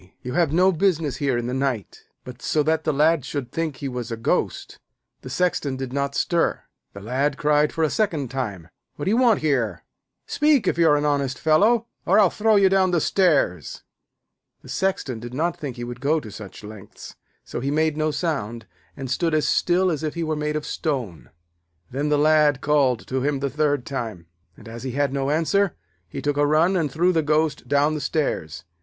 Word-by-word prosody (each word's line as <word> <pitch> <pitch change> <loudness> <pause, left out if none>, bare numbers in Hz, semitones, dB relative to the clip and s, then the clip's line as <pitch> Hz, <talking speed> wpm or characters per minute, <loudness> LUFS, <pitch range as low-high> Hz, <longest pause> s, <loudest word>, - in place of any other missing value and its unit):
You 125 - -5
have 165 -1 +2
no 185 +4 +4
business 165 -5 0
here 135 -4 0
in 120 - -2
the 125 - -3
night.' 130 -7 -3 0.2
But 125 -1 -11
so 150 - +1
that 160 +1 0
the 155 - +2
Lad 155 +1 +2
should 135 -2 -5
think 165 -3 -2
he 140 - -5
was 125 -2 -5
a 115 - -3
ghost, 115 - -2 0.4
the 130 - -9
Sexton 145 -3 -1
did 130 -1 -5
not 140 0 -2
stir. 170 -1 0 0.3
The 100 - -9
Lad 135 +6 -1
cried 150 0 +2
for 160 -1 0
the - - 0
second 160 - -1
time: 100 -11 -4 0.3
'What 145 - -5
do 195 - +1
you 225 - +3
want 245 -4 +4
here? 125 - 0 0.4
Speak 295 -4 +2
if - - 0
you 165 -1 +5
are 150 - +4
an 145 - -1
honest 140 -3 0
fellow, 215 +9 +3 0.2
or 195 - +3
I'll 200 -5 +5
throw 220 0 +2
you 200 -1 +5
down 190 -1 +3
the 175 -2 +2
stairs.' 150 - +1 0.8
The - - -13
Sexton 165 -11 -2
did 120 +2 -8
not 170 +4 -1
think 140 -6 -5
he 120 - -6
would 120 +1 -7
go 155 +4 +2
to 110 -7 -10
such 105 -1 -10
lengths, 105 -1 -11 0.3
so - - -6
he 135 - -2
made 155 +1 +1
no 155 0 0
sound, 120 - -3 0.3
and 135 -1 -5
stood 160 +5 0
as 155 - +1
still 180 +1 +2
as 155 - -3
if 155 0 -3
he 170 - -2
were 155 -1 -1
made 150 0 -2
of 150 - -3
stone. 125 - -4 0.6
Then 140 +4 -1
the 150 - +3
Lad 150 -1 +4
called 135 -5 +1
to 130 0 -2
him 140 0 0
the 140 -1 -2
third 145 -3 0
time, 110 -10 -5 0.3
and, 110 - -14
as 115 +1 -8
he 130 -2 -5
had 140 0 0
no 135 0 -1
answer, 165 +6 +1 0.3
he - - -6
took 145 -1 0
a 145 0 +3
run 160 +5 +3
and 160 -6 0
threw 175 +6 +2
the 165 - +2
ghost 155 -3 0
down 145 +3 +2
the 150 - -3
stairs. 105 - -2
145 Hz, 215 wpm, -23 LUFS, 130-160 Hz, 0.8 s, you